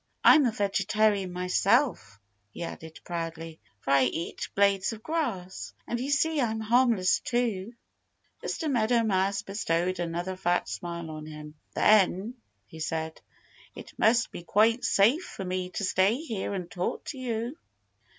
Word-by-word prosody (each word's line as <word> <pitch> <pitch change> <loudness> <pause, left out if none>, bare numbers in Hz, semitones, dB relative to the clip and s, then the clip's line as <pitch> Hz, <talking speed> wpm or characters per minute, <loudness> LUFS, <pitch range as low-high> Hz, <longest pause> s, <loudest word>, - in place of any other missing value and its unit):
"I'm 295 -4 +7
a - - +1
vegetarian 200 -1 +1
myself," 180 - +1 0.3
he 105 - -7
added 160 -1 -8
proudly, 165 -2 -5 0.2
"for 135 - -2
I 135 -1 +5
eat 165 +6 -3
blades 200 0 +3
of 220 -1 -11
grass. 240 - -3
And 240 - -3
you 260 +3 -3
see 295 +1 +2
I'm 220 -2 0
harmless 225 -4 +3
too." 230 -3 -2 0.7
Mr. 320 - -3
Meadow 235 -1 +2
Mouse 195 -1 +1
bestowed 185 -3 -1
another 175 +2 -3
fat 180 -1 0
smile 170 -2 -5
on 155 0 -8
him. 150 -1 -9 0.2
"Then," 210 +1 +4 0.3
he 160 - -12
said, 160 0 -3 0.5
"it - - -10
must 230 +1 +3
be - - -7
quite 220 +7 +3
safe 230 - +4
for 195 - -7
me 180 0 -2
to 195 - -4
stay 190 +3 +3
here 235 -11 -4
and 180 -3 -4
talk 180 - -3
with - - -6
you." 245 -1 -3
195 Hz, 150 wpm, -28 LUFS, 175-230 Hz, 0.7 s, I'm